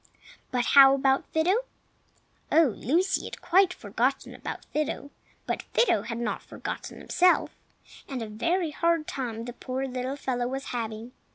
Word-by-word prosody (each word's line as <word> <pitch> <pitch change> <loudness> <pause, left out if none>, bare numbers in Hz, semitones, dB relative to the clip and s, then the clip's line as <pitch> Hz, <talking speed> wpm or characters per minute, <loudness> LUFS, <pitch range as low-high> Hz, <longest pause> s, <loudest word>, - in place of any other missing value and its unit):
But 250 -2 0
how 275 -1 +9
about 270 0 +2
Fido? 340 +6 +3 0.9
Oh, 315 -8 +5
Lucy 355 - +1
had - - -7
quite 375 +1 +4
forgotten 245 - -1
about - - -7
Fido. 290 -1 -2 0.3
But - - -2
Fido 485 - +4
had 230 - -5
not 225 -4 -2
forgotten - - -7
himself, 360 0 +3 0.6
and 260 -4 -4
a - - -5
very 335 - 0
hard 335 0 +1
time 230 -5 -4
the 245 - -6
poor 260 +2 -4
little 255 +1 -3
fellow 245 -3 -2
was 270 +2 -4
having. 225 0 -4
270 Hz, 150 wpm, -27 LUFS, 245-320 Hz, 0.9 s, how